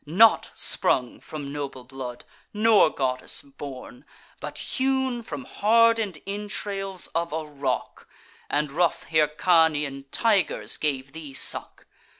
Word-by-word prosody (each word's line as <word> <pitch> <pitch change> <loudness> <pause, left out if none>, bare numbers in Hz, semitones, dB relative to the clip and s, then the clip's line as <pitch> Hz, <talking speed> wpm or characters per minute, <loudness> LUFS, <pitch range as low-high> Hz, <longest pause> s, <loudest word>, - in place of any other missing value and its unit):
Not 200 +9 +5
sprung 125 -2 +1
from 145 -2 -7
noble 140 -3 -5
blood, 125 -1 -8 0.3
nor 215 0 +5
goddess 130 -1 -2
born, 140 - -9 0.4
But - - -6
hewn 265 -2 0
from 145 - -6
harden'd 225 -5 +3
entrails 195 -2 -4
of 170 +1 -1
a 160 0 -3
rock! 140 -4 -3 0.4
And 150 -1 0
rough 170 +2 +1
Hyrcanian 150 -2 +2
tigers 205 - +2
gave 135 -3 -1
thee 150 -3 -9
suck! - - -2
155 Hz, 115 wpm, -25 LUFS, 140-205 Hz, 0.4 s, Not